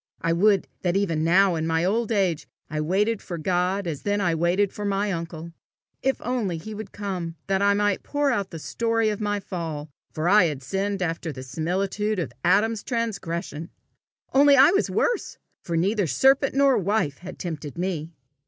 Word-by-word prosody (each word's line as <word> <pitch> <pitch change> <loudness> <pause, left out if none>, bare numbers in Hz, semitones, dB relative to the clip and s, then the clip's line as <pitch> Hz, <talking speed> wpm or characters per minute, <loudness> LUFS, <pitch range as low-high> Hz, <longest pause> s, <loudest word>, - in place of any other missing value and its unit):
I 165 0 +1
would 195 +2 +3
that 180 +1 +1
even 165 -6 0
now 185 +3 +4
in 160 -1 -1
my 165 +1 +1
old 225 +4 0
age 190 -7 0 0.2
I 155 -1 -1
waited 200 +7 +1
for 175 - -6
God 180 +3 0
as 160 -5 -4
then 205 0 0
I 175 -4 +1
waited 175 +5 +1
for 210 - -6
my 200 0 0
uncle! 165 -1 -5 0.5
If 270 0 0
only 225 -8 -1
he 215 +7 -8
would 210 -2 -7
come, 185 -5 -4
that 195 0 0
I 200 0 +4
might 205 -1 +1
pour 290 -1 0
out 200 -6 -1
the 165 - -7
story 225 +6 0
of 210 0 -3
my 205 -1 0
fall, 160 -6 -5 0.2
for 155 +2 -2
I 200 0 +6
had 145 -5 -3
sinned 195 +6 -2
after 165 -1 -3
the 130 -2 -8
similitude 190 +9 -1
of 175 - -3
Adam's 205 +5 +3
transgression! 175 - -3 0.6
only 280 +1 +6
I 275 +5 +8
was 395 - +1
worse, 480 -4 -1 0.2
for 170 -2 -2
neither 195 +2 +1
serpent 270 - +3
nor 275 -3 +4
wife 190 -7 0
had 180 - -9
tempted 155 -3 -6
me! 170 -3 -3
190 Hz, 185 wpm, -25 LUFS, 165-210 Hz, 0.6 s, I